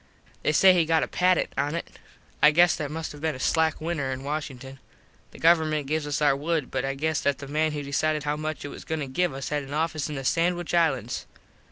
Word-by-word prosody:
They - - +1
say 185 +5 +6
he 170 -3 +3
got 160 0 +2
a - - -2
patent 180 0 +1
on 145 +3 0
it. 170 - -4 0.5
I 150 - +8
guess 170 +3 +5
that 145 -2 -4
must 160 +1 -5
have 145 - -11
been 160 -2 -1
a - - -9
slack 160 +3 +1
winter 155 -4 -2
in 130 0 -5
Washington. 135 -3 -5 0.5
The - - -14
government 160 -3 +3
gives 155 +1 -2
us 145 +1 -1
our 145 -2 +4
wood 155 +2 -2
but - - -1
I 135 0 -2
guess 155 +2 -1
that 140 -1 +1
the 140 - -9
man 155 +2 0
who 145 -1 -4
decided 150 +2 0
how 145 0 -1
much 155 0 -4
it - - -5
was - - -9
goin 160 - -3
to - - -2
give 175 +6 0
us 135 0 -5
had 150 -1 -1
an 140 +1 -7
office 155 -1 -1
in 150 - -4
the 135 -1 -5
Sandwitch 175 +3 0
Islands. 135 -9 0
150 Hz, 245 wpm, -26 LUFS, 140-160 Hz, 0.5 s, I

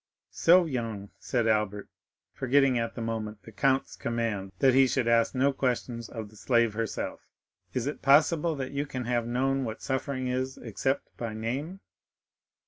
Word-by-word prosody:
"So 175 +1 +5
young," 115 -8 -4
said 120 -3 0
Albert, 105 -2 0 0.5
forgetting 130 -1 +3
at 115 0 -3
the 115 - -4
moment 110 -2 -4
the 115 - -12
Count's 135 +5 +1
command 115 -5 -2
that 135 -2 +4
he 135 +1 +6
should 125 -2 0
ask 115 +2 +3
no 135 +2 +3
questions 120 -3 -2
of 110 -3 -7
the - - -17
slave 115 0 +2
herself, 115 0 -3 0.5
"is 125 -2 0
it 145 - -4
possible 155 +3 +4
that 135 -2 -4
you 140 +1 -2
can 130 -3 -4
have 120 -1 0
known 135 +3 +1
what 115 0 -5
suffering 130 -1 -2
is 130 +1 -2
except 130 +4 -2
by 115 -2 -4
name?" 140 - -4
125 Hz, 165 wpm, -28 LUFS, 115-135 Hz, 0.5 s, he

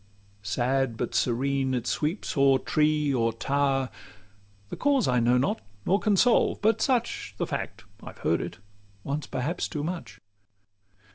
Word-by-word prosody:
Sad, 120 +4 0
but - - -3
serene, 130 +2 +1
it 120 - -2
sweeps 160 +7 -2
o'er 135 -2 +5
tree 150 +1 +1
or 115 -2 +2
tower; 135 +1 0 0.8
The - - -5
cause 280 -4 +2
I 125 -1 +3
know 120 +2 +3
not, 125 -3 0 0.2
nor 195 +2 +3
can 210 -3 +2
solve; 245 +4 +3
but 225 +1 +2
such 235 - 0
The - - -1
fact: - - -5 0.2
I've - - -10
heard - - 0
it - - -6 0.5
once 145 +2 -3
perhaps 140 +7 -2
too 150 -3 -4
much. 140 - -5
140 Hz, 150 wpm, -27 LUFS, 125-170 Hz, 0.8 s, o'er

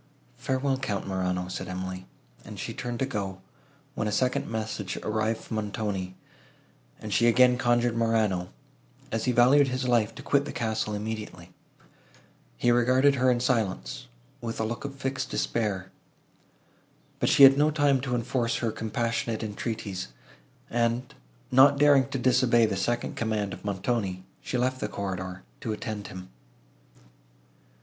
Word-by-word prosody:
"Farewell, 135 0 0
Count 105 -7 -2
Morano!" 90 -1 -1
said 95 0 -5
Emily; 95 0 -5 0.4
and - - -9
she - - -4
turned 120 -1 -4
to 135 - 0
go, 100 -7 -4 0.5
when 110 - -2
a - - -1
second 125 +5 0
message 110 -4 -3
arrived 110 +1 0
from 110 - -5
Montoni, 100 -3 -3 0.8
and 105 -1 -5
she 120 - +4
again 125 +1 +5
conjured 120 -1 +2
Morano, 110 -6 +1 0.6
as 115 - -1
he 125 - +2
valued 130 +4 +5
his 130 0 -2
life, 115 -4 +2
to - - -9
quit 140 0 +2
the - - -5
castle 110 -2 -2
immediately. 105 -5 -6 1.0
He 120 - +3
regarded 130 +4 +4
her 130 -1 +2
in 125 -1 +2
silence, 100 - -1 0.3
with 115 -1 -4
a - - +1
look 120 +4 -4
of 140 -1 -6
fixed 135 -1 -3
despair. 100 -5 -2 1.3
But - - +2
she 140 - +6
had 135 0 +10
no 150 +2 +3
time 145 -3 +2
to 125 -2 -1
enforce 120 0 -1
her 115 -2 -1
compassionate 115 +1 -2
entreaties, 105 - -4 0.6
and, 120 +1 -1 0.4
not 135 +2 +7
daring 140 -3 +5
to - - -2
disobey 125 -2 +4
the 105 - -1
second 120 +5 -1
command 110 -3 -1
of - - -10
Montoni, 100 -2 -2 0.2
she 125 - -3
left 130 +1 0
the - - -2
corridor, 95 -3 -5 0.2
to 110 - -4
attend 105 -2 -5
him. 95 0 -9
115 Hz, 150 wpm, -27 LUFS, 100-125 Hz, 1.3 s, had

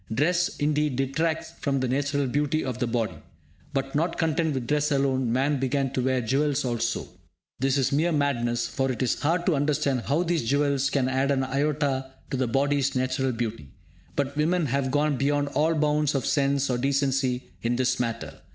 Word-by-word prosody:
Dress, 175 - +1
indeed, 150 -2 +1
detracts 155 +5 -1
from 140 -2 0
the 130 - 0
natural 140 +2 0
beauty 145 +4 0
of 125 -2 -4
the 125 - 0
body. 115 -2 -2 0.5
But, 135 -1 -2
not 165 +3 0
content 160 -2 +1
with 130 -2 -2
dress 150 +3 +1
alone, 135 -3 +1
man 135 +3 +1
began 135 0 0
to 130 - 0
wear 130 0 +1
jewels 140 +4 +1
also. 115 -1 -1 0.5
This 135 +1 +2
is 135 0 +1
mere 155 +5 +2
madness, 125 -6 0
for 135 -1 -1
it 125 0 -2
is 125 - 0
hard 165 +4 +1
to 180 - +3
understand 140 -2 +1
how 150 +7 +2
these 170 -4 0
jewels 140 -1 +2
can 135 -3 +1
add 130 +1 +1
an 135 -1 +2
iota 135 -1 -1 0.2
to 135 - -1
the 130 -1 0
body's 140 +2 +1
natural 130 +1 0
beauty. 115 - -4 0.5
But 140 0 -1
women 165 +3 +1
have 135 0 0
gone 145 +1 +1
beyond 145 +2 +1
all 160 +3 +1
bounds 150 -1 +1
of 135 -1 0
sense 140 -1 +1
or 120 - 0
decency 135 -1 0
in 120 +1 0
this 130 0 +1
matter. 115 -2 -4
140 Hz, 190 wpm, -26 LUFS, 130-150 Hz, 0.5 s, to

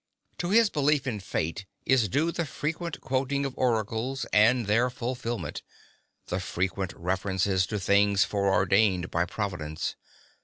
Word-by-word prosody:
To 175 - -2
his 220 +1 +5
belief 145 -1 +2
in 120 -5 -2
Fate 95 0 -3 0.2
is 130 -5 +3
due 160 - +1
the 170 -2 -2
frequent 160 +3 -4
quoting 135 +2 -1
of 135 - -4
oracles 120 +2 -1
and 115 +3 +5
their 115 +5 +3
fulfilment, 120 - -4 0.6
the 90 - -2
frequent 95 +1 -2
references 95 +1 0
to 105 - -2
things 100 +1 +3
foreordained 100 -1 +2
by 85 +1 +1
Providence. 85 -6 -4
105 Hz, 130 wpm, -27 LUFS, 95-130 Hz, 0.6 s, his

